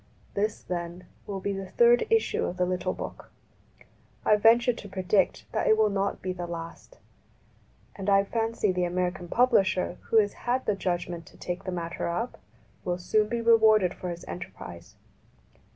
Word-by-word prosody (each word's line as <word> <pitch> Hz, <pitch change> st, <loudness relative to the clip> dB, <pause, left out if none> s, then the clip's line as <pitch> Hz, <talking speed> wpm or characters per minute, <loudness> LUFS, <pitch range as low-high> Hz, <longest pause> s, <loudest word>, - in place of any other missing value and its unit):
This, 210 Hz, +1 st, -1 dB
then, 175 Hz, 0 st, -5 dB, 0.2 s
will 195 Hz, -1 st, -4 dB
be 200 Hz, +1 st, -2 dB
the 195 Hz, -1 st, -6 dB
third 240 Hz, 0 st, +4 dB
issue 450 Hz, 0 st, +2 dB
of 180 Hz, -, -4 dB
the 180 Hz, -, +2 dB
little 180 Hz, 0 st, -1 dB
book. -, -, -7 dB, 1.0 s
I 215 Hz, -, +6 dB
venture 230 Hz, +3 st, +5 dB
to 205 Hz, -3 st, -10 dB
predict 190 Hz, +1 st, +1 dB
that -, -, 0 dB
it 220 Hz, -, +5 dB
will 215 Hz, -1 st, +3 dB
not 200 Hz, 0 st, -1 dB
be 185 Hz, 0 st, -2 dB
the 175 Hz, -1 st, -5 dB
last; 170 Hz, -, -8 dB, 1.0 s
and 195 Hz, 0 st, -3 dB
I 195 Hz, 0 st, +5 dB
fancy 225 Hz, -1 st, 0 dB
the 180 Hz, -1 st, 0 dB
American 180 Hz, 0 st, -2 dB
publisher 195 Hz, -5 st, +2 dB
who 225 Hz, -, +4 dB
has 205 Hz, -2 st, +4 dB, 0.2 s
had 255 Hz, +2 st, +1 dB
the 210 Hz, -, +2 dB
judg 175 Hz, -2 st, -1 dB
ment 170 Hz, -2 st, -7 dB
to -, -, -16 dB
take 175 Hz, 0 st, -5 dB
the 185 Hz, -, -2 dB
matter 170 Hz, -1 st, -3 dB
up 225 Hz, +9 st, -3 dB, 0.4 s
will 175 Hz, -1 st, -1 dB
soon 210 Hz, +4 st, +1 dB
be 235 Hz, -1 st, -1 dB
rewarded 220 Hz, -5 st, +5 dB
for 180 Hz, -, -6 dB
his 175 Hz, 0 st, -6 dB
enterprise. 95 Hz, -, -9 dB
190 Hz, 175 wpm, -27 LUFS, 180-220 Hz, 1.0 s, I